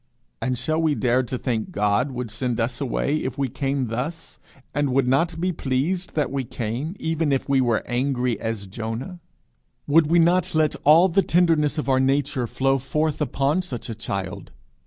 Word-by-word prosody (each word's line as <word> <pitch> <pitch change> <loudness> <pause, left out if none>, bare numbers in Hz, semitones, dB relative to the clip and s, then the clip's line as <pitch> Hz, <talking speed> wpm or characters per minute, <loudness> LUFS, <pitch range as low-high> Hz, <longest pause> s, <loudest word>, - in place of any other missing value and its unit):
And 130 -1 -1
shall 155 +7 -1
we 155 -2 +2
dare 125 -1 +2
to 125 0 -4
think 115 -4 -2
God 105 +6 +1
would 125 -3 -5
send 120 +1 -2
us 115 +4 -1
away 140 +2 0
if 130 -5 -4
we 135 -2 0
came 135 -1 -2
thus, 145 +9 -5 0.3
and 145 -1 0
would 135 -1 +2
not 165 +6 +1
be 185 +2 0
pleased 160 +5 -2
that 150 -4 0
we 135 -1 -1
came, 125 - -4
even 160 -2 0
if 135 - 0
we 135 -1 +3
were 120 -3 +1
angry 125 -2 0
as 110 -3 -3
Jonah? 115 - -5 0.7
Would 155 +1 +4
we 170 +3 +3
not 170 0 +3
let 155 -1 +2
all 160 +5 +7
the 190 +2 +3
tenderness 165 -4 +2
of 150 - -2
our 130 -1 +3
nature 135 -1 +1
flow 135 +3 +1
forth 150 +3 -1
upon 145 +4 +1
such 125 -10 -6
a - - -3
child? 100 -3 -5
135 Hz, 185 wpm, -23 LUFS, 120-155 Hz, 0.7 s, all